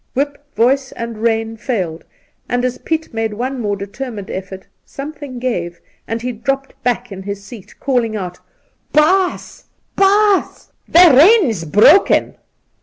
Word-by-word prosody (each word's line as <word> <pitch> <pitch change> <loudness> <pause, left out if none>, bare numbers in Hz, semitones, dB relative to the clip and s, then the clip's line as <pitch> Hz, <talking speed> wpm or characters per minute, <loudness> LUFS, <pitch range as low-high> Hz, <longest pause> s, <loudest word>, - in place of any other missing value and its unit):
Whip, 285 +1 -2
voice 265 +4 +2
and 230 -1 -6
rein 225 0 -1
failed, 185 - -3 0.4
and 245 0 0
as 250 0 -3
Piet 320 -4 -3
made 225 -1 -2
one 255 +3 -3
more 205 -2 -1
determined 205 +1 -7
effort, 190 0 -7 0.2
something 285 -2 -8
gave, 175 -9 -3 0.3
and 225 +1 -4
he 250 - -2
dropped 275 +4 -3
back 245 -1 -1
in 190 -1 -7
his 200 0 -6
seat, 210 -2 -13
calling 245 -5 0
out: 180 -3 -5 0.3
' - - -44
Baas, 365 +5 +1 0.3
baas, 400 0 +2 0.2
the 345 -3 +7
rein's 295 - +5
broken!' 210 - +4
240 Hz, 140 wpm, -17 LUFS, 210-275 Hz, 0.4 s, the